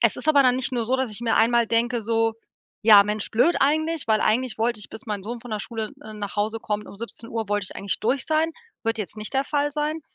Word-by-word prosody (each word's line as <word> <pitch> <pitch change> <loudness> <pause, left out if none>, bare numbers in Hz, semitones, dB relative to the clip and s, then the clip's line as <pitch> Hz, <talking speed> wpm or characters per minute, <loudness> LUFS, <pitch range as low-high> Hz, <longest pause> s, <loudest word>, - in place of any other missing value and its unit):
es - - +3
ist 310 - -4
aber 285 -2 +6
dann 250 -1 +4
nicht 260 0 -3
nur 235 -3 -1
so, 260 +3 +2
dass 260 -3 -1
ich 210 - -4
mir 235 -1 +1
einmal 235 +1 +4
denke, 235 +1 +1
so: 225 +1 +1 0.5
„Ja, 210 -2 +9
Mensch, 210 0 -2
blöd 245 +10 +3
eigentlich“, 315 +2 +1
weil 215 -1 +3
eigentlich 250 +2 +1
wollte 225 0 0
ich, 210 - -6
bis 220 +4 -10
mein 210 -4 -4
Sohn 235 +4 -5
von 245 0 -11
der 215 -1 -2
Schule, 220 -1 -4
äh, 215 0 -9
nach 205 -1 -6
Hause 215 +2 0
kommt, 210 -1 -3
um - - -11
17 230 +1 -8
Uhr, 225 -2 -3
wollte 205 -1 +1
ich - - -9
eigentlich 200 - -3
durch 250 +4 0
sein. 315 +1 +1 0.3
Wird 225 -1 0
jetzt 210 +1 -5
nicht 215 +5 -7
der 270 +1 +2
Fall 290 0 0
sein. 305 +2 -2
230 Hz, 265 wpm, -24 LUFS, 215-260 Hz, 0.5 s, Ja